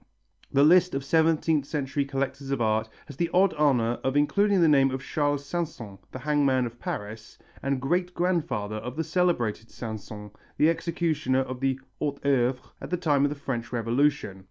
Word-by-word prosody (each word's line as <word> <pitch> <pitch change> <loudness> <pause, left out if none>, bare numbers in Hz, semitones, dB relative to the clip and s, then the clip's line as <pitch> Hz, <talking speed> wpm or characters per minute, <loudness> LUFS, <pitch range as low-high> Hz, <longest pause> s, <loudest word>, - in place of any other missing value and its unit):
The 140 - +4
list 180 +1 +5
of 135 - -2
seventeenth 160 -1 +2
century 140 -1 -2
collectors 135 0 -3
of 135 -2 -1
art 110 -1 +1 0.2
has 145 - -11
the 170 +1 0
odd 190 +1 +4
honour 125 -6 +2
of 135 +2 0
including 200 +7 +3
the 170 - +5
name 135 -3 +5
of 130 0 -4
Charles 145 -1 -1
Sanson, 140 - -5
the - - -6
hangman 140 -2 +1
of 120 0 -8
Paris, 110 +2 -6 0.2
and 135 -1 -1
great 175 +6 -1
grandfather 150 - -1
of 120 +3 -6
the 160 - -1
celebrated 120 - 0
Sanson, 105 -2 -8 0.3
the 155 +2 +5
executioner 160 -6 0
of 130 -1 -5
the 135 0 0 0.2
hautes 140 -2 -2
œuvres 130 -2 +2 0.2
at - - -7
the 180 - 0
time 145 -5 +2
of - - +1
the 150 - -4
French 130 -4 -4
Revolution. 120 -3 0
140 Hz, 180 wpm, -26 LUFS, 120-155 Hz, 0.3 s, list